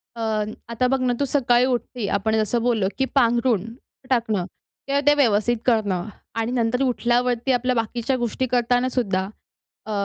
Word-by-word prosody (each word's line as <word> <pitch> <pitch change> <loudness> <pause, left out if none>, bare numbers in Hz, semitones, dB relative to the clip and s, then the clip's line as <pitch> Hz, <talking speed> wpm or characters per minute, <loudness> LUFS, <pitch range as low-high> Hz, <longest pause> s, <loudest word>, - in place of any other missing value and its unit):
अ, 230 - -6 0.5
आता 240 +2 0
बघ 265 +1 +1
ना, 250 -1 +1
तू 285 - +2
सकाळी 250 -3 +2
उठते, 245 -3 -2
आपण 220 +2 0
जसं 220 +2 0
बोललो 225 -6 +1
की 265 - +1
पांघरूण 235 -4 +2 0.4
टाकणं 220 -7 0 0.4
किंवा 280 +1 +1
ते 290 - +8
व्यवस्थित 240 -3 +2
करणं 205 -7 +1 0.3
आणि 225 +2 -1
नंतर 250 +1 0
उठल्यावरती 245 0 +1
आपल्या 250 0 +1
बाकीच्या 235 +3 -1
गोष्टी 240 +2 -1
करतानासुद्धा 245 -5 0 0.6
अ, - - -4
240 Hz, 150 wpm, -23 LUFS, 225-255 Hz, 0.6 s, ते